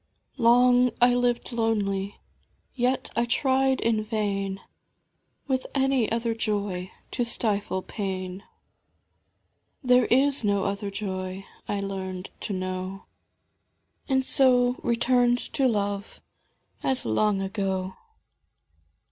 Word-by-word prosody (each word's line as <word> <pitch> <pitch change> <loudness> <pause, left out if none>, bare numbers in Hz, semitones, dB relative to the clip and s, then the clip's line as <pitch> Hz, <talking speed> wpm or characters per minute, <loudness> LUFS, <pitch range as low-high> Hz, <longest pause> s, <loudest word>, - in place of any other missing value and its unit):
Long 245 +1 +5
I 245 0 +5
lived 245 0 0
lonely, 205 -4 -1 0.6
yet 255 +1 0
I 235 - +2
tried 265 +2 +2
in 225 -2 +1
vain 200 -3 -2 0.9
With 260 -2 -1
any 270 -4 +2
other 230 0 0
Joy 200 -5 -2 0.2
to 245 - 0
stifle 205 -5 -1
pain; 190 -2 -5 1.4
There 250 0 +5
is 275 +1 +3
no 200 -2 +1
other 200 +1 -2
joy, 190 -1 -5 0.2
I 200 -1 -1
learned 190 -2 -5
to - - -4
know. 185 0 -4 1.0
And 265 -1 +2
so 250 -2 +3
returned 245 +1 +3 0.2
to 270 - +3
Love, 205 -3 -2 0.6
as 265 -1 -1
long 195 - +2
ago. 190 -1 -2
215 Hz, 105 wpm, -26 LUFS, 195-245 Hz, 1.4 s, Long